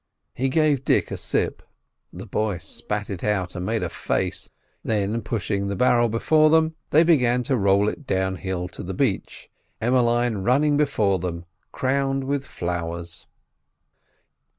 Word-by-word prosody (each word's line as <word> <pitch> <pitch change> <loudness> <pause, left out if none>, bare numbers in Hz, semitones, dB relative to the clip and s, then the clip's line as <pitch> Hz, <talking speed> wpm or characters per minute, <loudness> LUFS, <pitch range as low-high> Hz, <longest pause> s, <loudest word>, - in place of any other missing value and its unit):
He 135 +2 -1
gave 150 -2 +2
Dick - - +2
a - - -2
sip. - - -1 0.5
The - - -9
boy 105 -4 -1
spat 105 +4 -4
it 95 - -5
out, 95 -4 -1
and 90 - -4
made 110 0 0
a - - -2
face, - - -2 0.3
then, 105 +1 0
pushing 100 -2 -2
the 100 - -2
barrel 120 +2 +3
before 155 +8 +3
them, 160 0 +3 0.2
they 155 +3 +5
began 125 -7 +3
to 130 - +1
roll 100 -2 +3
it 135 +5 -4
downhill 95 -1 -1
to - - -9
the 95 +1 -5
beach, 115 -7 -2 0.3
Emmeline 120 -1 +2
running 135 +9 +2
before 110 -10 +2
them 85 -1 -4 0.3
crowned 135 +1 0
with 140 0 -2
flowers. 85 0 -4
110 Hz, 150 wpm, -24 LUFS, 95-135 Hz, 0.5 s, they